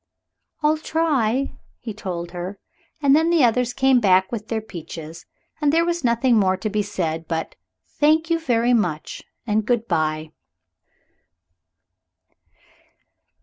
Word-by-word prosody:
"I'll 305 +1 +3
try," 275 -6 0 0.3
he 225 -3 -6
told 175 -5 -5
her, 180 +3 -6 0.5
and 280 0 +6
then 320 +2 +3
the 335 -4 +4
others 245 +1 +2
came 265 0 +3
back 190 -3 +3
with 220 -3 -5
their 225 -1 -1
peaches, 165 -5 -9 0.3
and 290 -1 +3
there 330 +2 +3
was 345 -2 -1
nothing 235 0 +3
more 190 -2 +2
to 210 +3 -3
be 210 0 +1
said 165 -6 -3
but 160 -1 -3 0.5
"Thank 315 +2 +3
you 330 - +2
very 245 -5 +2
much" 175 -10 -1 0.2
and 215 -1 +1
good 235 +1 0
bye. 155 0 -1
225 Hz, 135 wpm, -22 LUFS, 185-275 Hz, 0.5 s, and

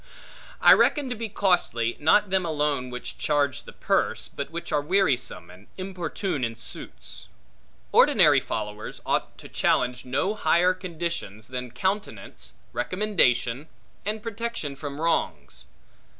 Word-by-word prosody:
I - - +9
reckon 285 -4 +3
to - - -1
be 225 0 -4
costly, 175 - +1
not 185 +6 +4
them 190 -1 +2
alone 150 -5 0
which 125 0 -7
charge 145 -3 0
the - - -10
purse, - - 0
but 140 - -5
which 170 +1 -6
are 145 - +2
wearisome, 145 - 0
and 95 +3 -16
importune 185 -4 -3
in 115 -1 -2
suits. - - -10 0.6
Ordinary - - +6
followers 105 -1 -5
ought - - -1
to - - -11
challenge 125 0 +1
no 130 +11 0
higher 180 -2 +3
conditions, 170 - -5
than 125 -1 -4
countenance, 125 - -3 0.2
recommendation, 130 - +1 0.4
and 210 +2 -3
protection 230 -10 -4
from 145 0 -6
wrongs. 155 - -1
150 Hz, 130 wpm, -26 LUFS, 125-190 Hz, 0.6 s, I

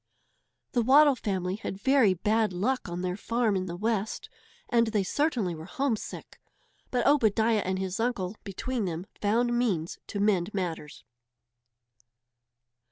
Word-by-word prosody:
The 245 - +2
Waddle 280 +5 +6
family 190 -4 -2
had 205 -3 -5
very 255 -5 +4
bad 215 +2 +1
luck 225 +5 -1
on 175 +1 -4
their 180 0 -2
farm 230 0 0
in 185 0 -2
the 170 - -5
West. 215 +2 -2 0.4
And 235 -1 +3
they 215 -3 +1
certainly 235 - 0
were 160 0 -8
homesick! 275 -7 -3 0.5
But 245 -2 0
Obadiah 225 -5 +3
and 190 0 -1
his 190 +1 -3
uncle, 220 -5 -1
between 220 +3 -3
them, 170 0 -4 0.2
found 235 +4 +2
means 195 -10 -1
to 205 - -4
mend 200 -1 +1
matters. 165 -6 -4
210 Hz, 140 wpm, -28 LUFS, 185-240 Hz, 0.5 s, Waddle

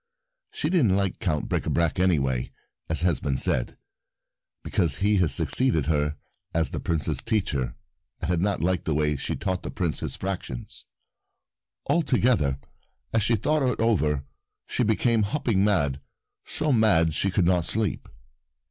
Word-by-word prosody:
She 155 - -2
didn't 125 - +3
like 100 -2 -1
Count 80 -9 -1
Bricabrac 85 0 0
any 90 -3 +4
way, 65 -3 -1 0.4
as 80 - +1
has 85 -3 +2
been 70 -3 -1
said, - - 0 0.9
because 90 -6 0
he 105 +1 +2
had 90 -4 +3
succeeded 120 - +2
her 75 -1 0 0.4
as 80 -1 +1
the - - -3
Prince's 75 -4 0
teacher 75 - -1 0.4
and 85 - -3
had 85 -1 +1
not 100 -4 0
liked 90 0 0
the 80 - 0
way 75 0 +1
she 70 - -3
had - - -7
taught 95 -1 -1
the - - -6
Prince 85 -4 -2
his - - -4
fractions. 95 -10 -6 1.0
Altogether, 125 - +2 0.6
as 115 - +3
she 115 +3 +2
thought 150 +8 +1
it 125 -3 0
over 75 -11 +1 0.4
she - - -2
became 115 0 +2
hopping 105 -3 +1
mad, 75 -10 +1 0.4
so 155 - -1
mad 100 - +4
she 95 - 0
could 90 -1 +1
not 90 -1 +3
sleep. 110 -3 -2
90 Hz, 155 wpm, -26 LUFS, 75-110 Hz, 1.0 s, any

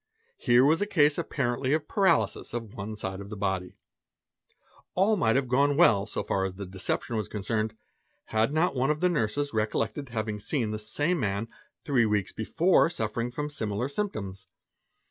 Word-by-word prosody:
Here 120 +1 +5
was 160 +6 +3
a 205 - +1
case 150 -6 +3
apparently 125 +3 -1
of 155 -1 0
paralysis 190 - +1
of 115 -3 -5
one 105 +2 -5
side 95 -2 -5
of 100 - -9
the 105 - -7
body. 95 -2 -2 1.2
All 200 +4 +4
might 115 - +2
have 135 -1 +1
gone 140 +3 +2
well 110 - +5
so - - -3
far 95 - 0
as 95 -1 -3
the 100 +1 -6
deception 95 +5 -3
was 110 - -2
concerned, 110 +1 -2 0.6
had 110 +3 +2
not 160 +2 +2
one 130 +1 +1
of 150 0 +1
the; 180 - +1
of 180 - +4
a - - -1
particular 115 -9 +2
case. 105 - -7
nurses 145 -2 -1
recollected 110 +5 -1
having 110 -2 -3
seen 105 +2 -1
the 110 - -3
same 145 +11 0
man 105 0 -1 0.4
three 125 -6 +3
weeks 105 -3 0
before 165 - +3
suffer 115 -7 -3
ing 120 - -2
from 150 +4 -4
similar 110 -2 -2
symptoms. 100 - -4
115 Hz, 195 wpm, -28 LUFS, 105-145 Hz, 1.2 s, Here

